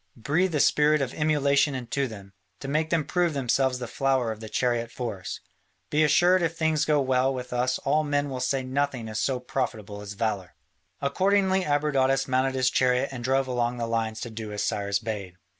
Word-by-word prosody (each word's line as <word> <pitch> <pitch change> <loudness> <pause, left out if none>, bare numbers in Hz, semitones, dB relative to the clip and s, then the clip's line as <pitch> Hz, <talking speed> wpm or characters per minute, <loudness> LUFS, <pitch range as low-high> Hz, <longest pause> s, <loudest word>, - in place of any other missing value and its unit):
Breathe 160 +9 0
a - - +2
spirit 150 +2 +4
of 135 -3 -2
emulation 145 -2 +2
into 130 +2 -2
them, 100 -4 -11 0.3
to - - -7
make 155 +3 0
them 165 -3 +1
prove 175 -3 0
themselves 130 0 +1
the 125 -1 -5
flower 130 -1 0
of 110 - -7
the 110 -1 -8
chariot 120 -1 0
force. 110 -8 -5 0.5
Be 150 +1 +3
assured 175 +5 +4
if 165 -1 -1
things 160 -2 +1
go 150 -1 +3
well 130 -1 +2
with 125 -2 -5
us 125 +1 +1
all 155 +3 +1
men 145 -1 0
will 130 -2 -4
say 130 +1 0
nothing 130 -3 -2
is 110 0 -4
so 130 -2 0
profitable 110 -5 -4
as 105 0 -7
valour." 100 -4 -3 0.5
Accordingly 190 +5 +2
Abradatas 135 -2 +1
mounted 130 0 +1
his 130 0 +2
chariot 125 +1 +2
and 125 -3 -6
drove 135 +2 +2
along 120 -1 -1
the 120 - -2
lines 115 -1 -2
to 120 - -5
do 110 -1 -6
as 105 - -2
Cyrus 100 0 0
bade. 100 -4 -5
130 Hz, 195 wpm, -26 LUFS, 115-145 Hz, 0.5 s, spirit